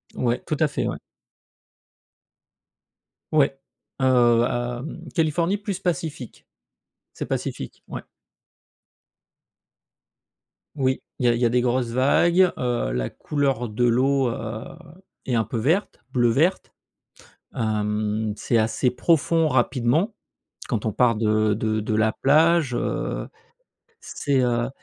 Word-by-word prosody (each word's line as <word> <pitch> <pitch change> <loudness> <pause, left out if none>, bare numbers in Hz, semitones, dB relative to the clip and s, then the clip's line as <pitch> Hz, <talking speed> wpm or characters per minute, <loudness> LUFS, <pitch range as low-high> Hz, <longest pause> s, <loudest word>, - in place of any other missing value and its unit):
Ouais, 120 -1 0
tout 155 - -1
à 155 - +4
fait, - - -2
ouais. - - -3 2.3
Ouais. 140 -3 +3 0.4
Heu, - - +3 0.4
à 120 0 -2
mmh, 165 +1 -8
Californie, 165 +4 +1
plus 205 -3 -4
Pacifique. 160 - -4 0.7
C'est - - -5
Pacifique, - - -5
ouais. - - -6 2.7
Oui. 130 -2 0 0.2
Il 125 - -1
y - - +6
a - - +4
il 120 - -2
y - - +4
a - - +4
des 125 +1 +2
grosses 125 0 0
vagues. 170 +9 +3
Heu, 120 - -1
la - - -2
couleur 135 -5 -1
de 110 +3 0
l'eau, 130 +2 +2
heu, 110 -1 -5 0.6
est 125 - -1
un 115 - +2
peu 110 +3 -5
verte, 160 - 0
bleu-verte. 130 +9 +2 0.8
Hem, 105 0 -1
c'est 120 - 0
assez 115 +3 +1
profond 165 +4 +2
rapidement, 130 - +1 0.6
quand 115 -4 -2
on 110 - 0
part 120 +1 +3
de 110 -1 +2
de 110 0 -1
de 110 +1 -2
la 110 0 +2
plage, 155 0 +3
heu. - - -2 0.7
C'est 140 -2 -1
heu 120 -1 +1
125 Hz, 125 wpm, -23 LUFS, 115-150 Hz, 2.7 s, y